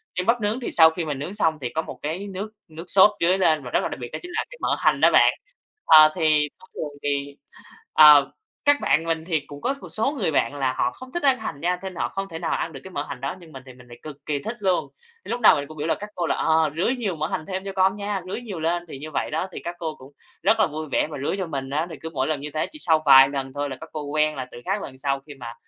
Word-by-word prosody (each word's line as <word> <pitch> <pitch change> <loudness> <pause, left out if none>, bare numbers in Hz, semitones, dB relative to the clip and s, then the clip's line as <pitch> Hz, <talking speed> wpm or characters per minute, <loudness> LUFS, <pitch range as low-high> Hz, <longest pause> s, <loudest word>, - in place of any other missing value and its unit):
Nhưng 180 - -1
bắp 230 +2 +2
nướng 210 +4 -1
thì 245 - -4
sau 160 -1 +7
khi 165 0 -4
mình 145 -3 -3
nướng 160 +7 -5
xong 160 -7 +1
thì 125 - -3
có 160 - +1
một - - -9
cái 170 +7 -4
nước 200 +2 -6 0.2
nước 160 +1 -9
sốt 195 +3 +6
rưới 180 +3 +3
lên 160 -6 +2
và 125 - -8
rất - - +2
là - - 0
đặc - - -7
biệt 120 - -6
đó - - -4
chính 355 - -9
là - - -1
cái - - -11
mỡ - - +1
hành - - +2
đó - - +6
bạn. - - +6 0.5
Ờ, 155 -1 +9
thì 155 -2 +2
thông 185 - -19
thường 145 -1 -6
thì, 140 0 -2 0.6
ờ, 150 -2 +8 0.3
các 290 0 +6
bạn 165 - +2
mình 165 -1 -2
thì 165 -3 0
cũng 145 -1 -10
có 270 - -1
một - - -10
số 225 +6 0
người 195 - +1
bạn 135 -1 +1
là 135 -2 0
họ 125 - +2
không 255 0 -11
thích 345 - -3
ăn 270 -2 +4
hành 220 -10 -6
nha 180 +2 0
nên 190 -1 -6
họ - - -2
không 195 0 -5
thể 165 - -7
nào 165 - -3
ăn 165 - -3
được 135 - -9
cái 190 - -9
mỡ 145 -6 -3
hành 130 - -7
đó, 135 +7 -4
nhưng 165 -3 -15
mình 135 -2 -10
thì 130 - -11
mình 125 0 -17
lại 120 0 -12
cực 150 -2 -11
kì 150 -2 -1
thích 230 - -5
luôn, 185 -3 +1 0.4
lúc 240 - -3
nào 220 - +7
mình 140 0 -4
cũng 155 - -11
biểu 150 0 -3
là - - +2
các 210 +1 -9
cô 175 - -2
là, - - +1
ờ, 160 -1 +2
"rưới 185 +10 +1
nhiều 205 -8 -2
mỡ 155 0 -1
hành 155 -1 -4
thêm 190 0 -4
cho 195 - -5
con 190 0 +2
nha, 205 -1 -3
rưới 190 +5 -4
nhiều 205 -8 -7
lên" 170 +2 -1
thì 135 - -8
như 155 +3 -8
vậy 145 - -2
đó 160 +4 -1
thì - - -7
các 175 +1 -5
cô 160 -3 -4
cũng 130 +2 -15 0.3
rất 225 0 +3
là 215 - +5
vui 155 0 -5
vẻ - - +2
mà 150 - -6
rưới - - 0
cho 190 -2 -3
mình 135 -4 -5
á. 155 +4 -1
Thì 160 - -7
cứ 160 - -5
mỗi 130 -4 -1
lần 155 -2 -2
như 150 +1 -6
thế 155 - 0
chỉ 305 - -11
sau 160 - +2
vài 135 -1 +9
lần 135 -1 -4
thôi 145 0 -3
là 130 - -5
các 160 - -9
cô 155 - -4
quen 155 +1 0
là 130 -2 -5
từ - - -9
các 195 +2 -1
lần 130 - -8
sau 135 0 -1
khi 145 - -10
mà 120 -3 -9
160 Hz, 315 wpm, -24 LUFS, 145-190 Hz, 0.6 s, Ờ